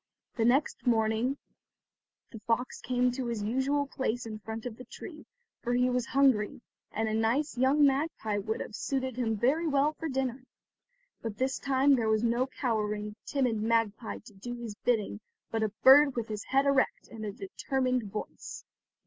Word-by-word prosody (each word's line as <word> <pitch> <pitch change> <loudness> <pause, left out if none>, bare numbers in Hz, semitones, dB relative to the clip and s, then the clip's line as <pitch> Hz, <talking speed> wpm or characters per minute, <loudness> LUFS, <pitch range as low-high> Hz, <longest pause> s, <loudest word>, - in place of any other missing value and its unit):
The 225 - +1
next 260 +2 +2
morning 225 +3 +2 0.9
the 225 - -8
fox 235 +2 0
came 250 0 +1
to 250 0 -3
his 230 -3 -2
usual 265 +6 +1
place 250 -3 -2
in 215 -1 -6
front 220 +2 -6
of 240 -3 -4
the 250 - -10
tree, - - -10 0.3
for 245 0 0
he 250 +1 +3
was 250 -1 0
hungry, 260 -7 +3 0.3
and 220 +1 -1
a 215 - -1
nice 230 +7 +1
young 270 +4 +4
magpie 270 -7 0
would 220 +2 -3
have - - -6
suited 260 -1 -2
him 225 -3 0
very 290 +10 +2
well 290 +1 +2
for 320 +1 -5
dinner. 260 -1 -2 0.8
But 220 -3 -5
this 260 +2 0
time 275 +1 +4
there 225 -2 +1
was 220 +1 +2
no 240 +2 +2
cowering, 210 -5 -2
timid 250 -6 0
magpie 225 0 0
to 215 - -13
do 240 +5 -6
his 235 -3 -6
bidding, 210 -2 0 0.3
but 225 - -1
a 220 - +1
bird 275 +1 +8
with 230 -2 -3
his 210 -1 -4
head 275 +1 +2
erect 275 -1 +2
and 225 -1 -7
a 210 - -3
determined 250 +3 -2
voice. 210 - -7
245 Hz, 175 wpm, -30 LUFS, 220-265 Hz, 0.9 s, bird